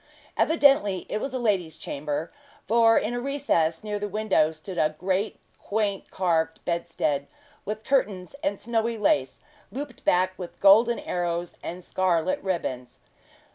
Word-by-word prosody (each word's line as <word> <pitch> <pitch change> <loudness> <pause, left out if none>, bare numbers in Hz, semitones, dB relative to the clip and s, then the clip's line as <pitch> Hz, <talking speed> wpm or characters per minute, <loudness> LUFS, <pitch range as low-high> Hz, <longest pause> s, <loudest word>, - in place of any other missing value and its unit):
Evidently 275 - +3
it 210 - -1
was 275 - -3
a 260 - -2
lady's 195 -9 0
chamber; 150 +2 -4 0.4
for 225 0 +5
in 215 +3 0
a 245 - -1
recess 240 - 0
near 210 -1 -3
the 205 - -2
window 205 -6 +2
stood 165 +3 -7
a 155 -1 +2
great 190 +4 -1 0.2
quaint 205 -2 -2
carved 165 -3 0
bedstead, 165 -5 -1 0.4
with 215 +1 -4
curtains 205 -10 0
and 200 0 -1
snowy 230 0 -1
lace, 300 +8 +1 0.3
looped 275 -3 -7
back 185 +1 +3
with 180 -2 -8
golden 225 +4 +6
arrows 175 -1 -2
and 180 +2 -6
scarlet 185 -1 0
ribbons. 130 -10 -3
190 Hz, 140 wpm, -26 LUFS, 170-225 Hz, 0.4 s, golden